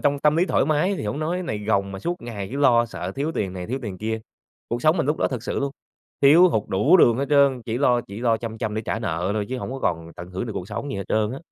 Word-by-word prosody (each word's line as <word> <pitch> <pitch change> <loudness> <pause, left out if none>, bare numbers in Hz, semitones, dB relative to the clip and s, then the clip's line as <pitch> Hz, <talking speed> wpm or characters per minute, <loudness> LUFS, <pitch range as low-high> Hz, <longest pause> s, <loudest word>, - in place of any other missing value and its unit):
trong 145 0 +2
tâm 150 +2 +3
lý 175 - +4
thoải - - +2
mái 155 +6 +2
thì 165 - -5
hổng 105 +8 -3
nói. 165 +3 -1
Cái 185 - -3
này 110 -11 -3
gồng 100 -2 0
mà 95 - -6
suốt 175 - -4
ngày 105 -5 -5
cứ 140 - -3
lo 120 -4 +4
sợ 95 -4 -6
thiếu 150 +4 -2
tiền 95 -9 -2
này 90 -1 -6
thiếu 130 +4 -2
tiền 95 -5 -6
kia, 110 +1 -2 0.5
cuộc 120 +1 -3
sống 155 +3 +4
mình 160 - 0
lúc 150 - +1
đó - - +1
thực 125 -4 -4
sự - - -2
luôn, 140 0 -1 0.5
thiếu 165 +6 +7
hụt 110 - 0
đủ 135 - +4
đường 120 -9 +5
hết 140 - 0
trơn, 140 -4 +4
chỉ 115 +1 -2
lo 125 -3 +3
chỉ 105 -1 -9
lo 115 -2 +2
chăm 110 -1 -6
chăm 110 -1 -2
để 110 - -2
trả 115 - -2
nợ 90 -3 -2
thôi 105 -1 -1
chứ 130 0 -3
hổng - - -5
có 135 - -4
còn 85 -7 -2
tận 90 +1 -9
hưởng 95 +6 -4
được 110 - -4
cuộc 95 0 -5
sống 125 +7 -4
gì 100 - -3
hết 100 - -4
trơn 110 +1 +1
á. 135 - -5
120 Hz, 315 wpm, -23 LUFS, 105-140 Hz, 0.5 s, thiếu